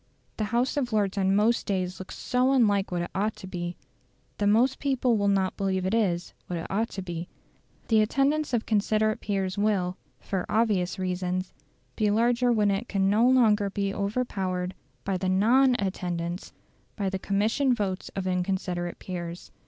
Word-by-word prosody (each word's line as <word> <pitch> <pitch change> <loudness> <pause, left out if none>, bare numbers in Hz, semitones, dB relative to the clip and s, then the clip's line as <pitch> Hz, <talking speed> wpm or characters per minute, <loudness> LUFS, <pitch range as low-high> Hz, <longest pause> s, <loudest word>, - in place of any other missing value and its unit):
The 215 - 0
House 240 +6 0
of 250 -4 0
Lords 205 -3 +1
on 190 0 +2
most 220 +3 +2
days 185 -2 -2
looks 190 - -8
so 255 +2 +1
unlike 205 -7 +3
what 175 -1 -1
it - - -6
ought 210 +3 0
to - - -10
be, 175 -2 -4 0.6
that 205 - +2
most 240 +6 +3
people 260 -4 +1
will 205 -1 +1
not 195 -2 +1
believe 190 -2 -1
it 190 - 0
is 180 -6 0
what 175 - -3
it 165 - -5
ought 220 +4 0
to 195 - -6
be. 175 -1 -5 0.6
The 220 -2 +4
attendance 280 +7 +1
of 235 -3 0
considerate 215 0 +1
peers 195 -1 -2
will, 190 -4 +1 0.2
for 190 -2 -3
obvious 205 -4 +1
reasons, 185 0 -2 0.4
be 215 -2 +1
larger 240 +3 +3
when 210 -3 +3
it 200 +5 -2
can 195 -1 +2
no 225 +4 +4
longer 215 -6 +4
be 200 0 -2
overpowered 195 -4 -2 0.3
by 195 -1 -1
the 185 0 -1
NON 245 +7 +4
attendance, 180 -3 -3 0.4
by 200 -2 -2
the 190 0 -2
commissioned 225 +7 +1
votes 190 -2 -2
of 195 -1 -3
inconsiderate 180 -1 -2
peers. 175 -2 -6
200 Hz, 175 wpm, -27 LUFS, 185-225 Hz, 0.6 s, The